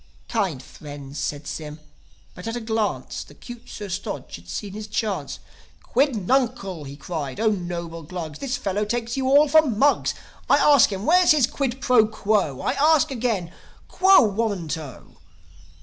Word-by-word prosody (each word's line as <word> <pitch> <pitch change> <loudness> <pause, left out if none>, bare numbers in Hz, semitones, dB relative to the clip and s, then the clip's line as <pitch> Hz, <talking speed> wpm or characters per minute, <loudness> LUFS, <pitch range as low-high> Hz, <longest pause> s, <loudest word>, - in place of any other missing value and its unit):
"Kind 190 - -1
friends," 145 0 -9
said 145 0 -3
Sym... 150 0 -6 0.5
But, 180 - -9
at 225 - -3
a - - -2
glance, 220 -2 -2
The - - -17
'cute 240 0 -11
Sir 205 - -7
Stodge 175 -7 -5
had 85 +1 -13
seen 195 - -5
his 215 0 -7
chance. 210 -1 -2 0.5
"Quid 270 0 +1
nuncl" 200 - -1
he 140 - -8
cried. 145 -2 -5
"O 220 -1 +3
noble 170 -3 -4
Glugs, 160 -2 -7
This 275 -1 -2
fellow 200 +2 -1
takes 235 +2 -2
you 265 -1 -1
all 285 +3 +6
for 315 +2 +6
mugs. 280 0 +2 0.3
I - - +6
ask 285 -7 +5
him, 195 +1 -4
where's 360 0 +6
his 290 -5 +4
quid 265 0 -3
pro 230 -4 +4
quo? 200 -10 0
I - - 0
ask 310 +1 +3
again, 220 -9 -2 0.3
quo 380 -6 +6
warranto? 180 - -3
210 Hz, 165 wpm, -23 LUFS, 170-250 Hz, 0.5 s, all